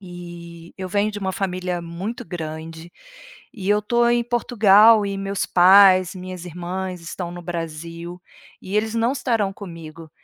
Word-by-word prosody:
e 170 -2 -11
eu 185 - -5
venho 205 +2 +1
de 205 - -5
uma 190 -2 -3
família 180 -2 -3
muito 180 +7 -6
grande, 160 0 -7 0.6
e 195 -3 -6
eu 210 0 +3
estou 235 +3 +2
em 240 0 +2
Portugal 225 -3 +5
e 200 0 -4
meus 195 -1 -2
pais, 185 0 +6
minhas 185 -1 -8
irmãs 180 +1 -5
estão 170 +1 -6
no 175 0 -8
Brasil, 170 +1 -6 0.4
e 195 +2 -4
eles 220 +1 0
não 230 +1 +1
estarão 230 -7 -1
comigo, 165 -4 -10
185 Hz, 150 wpm, -22 LUFS, 170-205 Hz, 0.6 s, pais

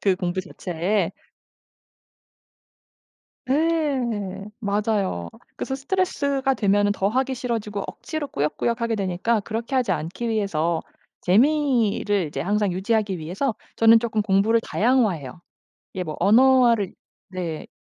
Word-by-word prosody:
그 195 -2 +3
공부 180 0 -2
자체에. 180 +1 -2 2.4
네. 260 - 0 0.2
맞아요. 200 - -1 0.3
그래서 265 - -3
스트레스가 280 -3 0
되면은 205 -2 +2
더 195 -1 0
하기 260 +4 0
싫어지고 225 -5 -3
억지로 310 -2 -5
꾸역꾸역 190 - -1
하게 230 -1 0
되니까 200 +3 0
그렇게 225 +5 -4
하지 255 -2 +2
않기 175 +10 -3
위해서 170 -7 0 0.4
재미를 225 - +2
이제 150 - -5
항상 205 +1 +1
유지하기 200 0 0
위해서 185 - -2 0.2
저는 225 0 +7
쪼끔 225 -2 -1
공부를 205 +3 +3
다양화해요. 210 - 0 0.5
이게 185 - -3
뭐 155 -3 -5
언어를 235 0 +4 0.4
네 175 -4 -5
210 Hz, 280 characters per minute, -23 LUFS, 185-245 Hz, 2.4 s, 저는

